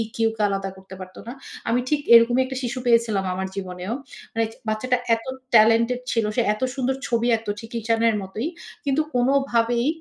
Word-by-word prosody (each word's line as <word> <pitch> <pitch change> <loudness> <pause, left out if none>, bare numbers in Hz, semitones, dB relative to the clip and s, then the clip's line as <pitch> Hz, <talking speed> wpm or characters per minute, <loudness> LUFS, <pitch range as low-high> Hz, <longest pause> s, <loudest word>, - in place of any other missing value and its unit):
Q - - -8 0.2
কে 215 - -4
আলাদা 195 0 -2
করতে 190 0 -12
পারত 185 0 -10
না। - - -4 0.4
আমি 240 - +2
ঠিক 300 -1 +1
এরকমই 240 +2 +6
একটা 265 0 -5
শিশু 240 +1 -3
পেয়েছিলাম 230 -5 +2
আমার 190 +1 -3
জীবনেও। 185 +1 -5 0.4
মানে 225 0 +1 0.2
বাচ্চাটা 250 +4 0 0.2
এত 225 - -9 0.3
টেলেন্টেড 230 +3 +5
ছিল। 230 -2 +1
সে 240 - +3
এত 215 - -10
সুন্দর 265 0 0
ছবি 235 0 +1
আঁকতো 220 -2 -3
ঠিক 225 +1 -11
ঈশানের 225 0 +2
মতোই। 205 +8 -4 0.4
কিন্তু 280 +2 +2
কোনভাবেই 245 -1 +2
230 Hz, 175 wpm, -23 LUFS, 215-245 Hz, 0.4 s, এরকমই